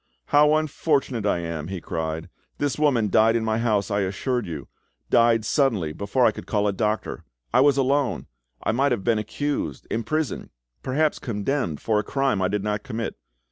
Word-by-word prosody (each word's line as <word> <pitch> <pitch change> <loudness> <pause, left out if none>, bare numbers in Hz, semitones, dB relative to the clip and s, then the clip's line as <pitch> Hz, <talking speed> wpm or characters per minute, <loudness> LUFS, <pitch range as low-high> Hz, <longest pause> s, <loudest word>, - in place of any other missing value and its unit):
"How 150 +1 +5
unfortunate 140 -7 0
I 85 - +1
am!" 85 -2 -4
he 95 0 -4
cried. 80 0 -4 0.3
"This 145 0 -1
woman 125 -9 +2
died 110 +2 +5
in 115 -1 0
my 110 0 0
house, 110 -3 +1
I 100 - +1
assure 115 +6 -1
you—died 110 - 0
suddenly, 110 - +1
before 100 +8 +1
I - - +5
could - - -10
call 105 -1 +1
a 100 - +1
doctor. 105 +2 -2 0.3
I - - +6
was 140 0 +4
alone; 140 0 +1 0.4
I - - +1
might 135 +5 +2
have 105 -5 -3
been 115 -2 +2
accused, 145 +7 -3
imprisoned, 140 +7 -2 0.3
perhaps 150 +4 0
condemned 105 - -2
for 110 -2 +1
a - - -1
crime 135 -7 0
I 95 - +3
did 100 +1 -2
not 105 0 -1
commit. 115 +2 -4
115 Hz, 180 wpm, -24 LUFS, 100-135 Hz, 0.4 s, I